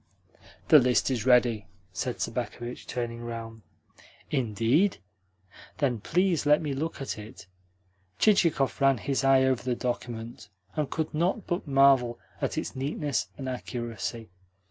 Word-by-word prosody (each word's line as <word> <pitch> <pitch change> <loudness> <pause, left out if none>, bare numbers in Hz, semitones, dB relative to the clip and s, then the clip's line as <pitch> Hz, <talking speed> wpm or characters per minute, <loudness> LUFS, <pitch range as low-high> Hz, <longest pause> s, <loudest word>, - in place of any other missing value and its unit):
"The 155 - +9
list 125 +1 +2
is 125 -1 -2
ready," 120 -4 +4 0.3
said - - -3
Sobakevitch, 120 0 -4
turning 120 -1 -4
round. 115 -1 -7 0.7
"Indeed? 130 - +2 0.8
Then 130 -6 0
please 175 - +1
let 150 +1 +5
me 150 -3 -3
look 155 +5 -3
at 135 -5 -4
it." 105 0 -11 0.7
Chichikov 165 -10 +3
ran 135 -1 +5
his 135 +5 -1
eye 135 -1 +5
over 130 -2 +2
the 125 -1 -1
document, 120 -3 -5 0.3
and 150 -3 -1
could 160 -1 -3
not 175 +7 0
but 175 -2 -3
marvel 135 -4 +4 0.2
at - - -1
its - - -3
neatness 135 -5 -2
and 130 - -5
accuracy. 120 -3 -5
130 Hz, 135 wpm, -28 LUFS, 120-145 Hz, 0.8 s, The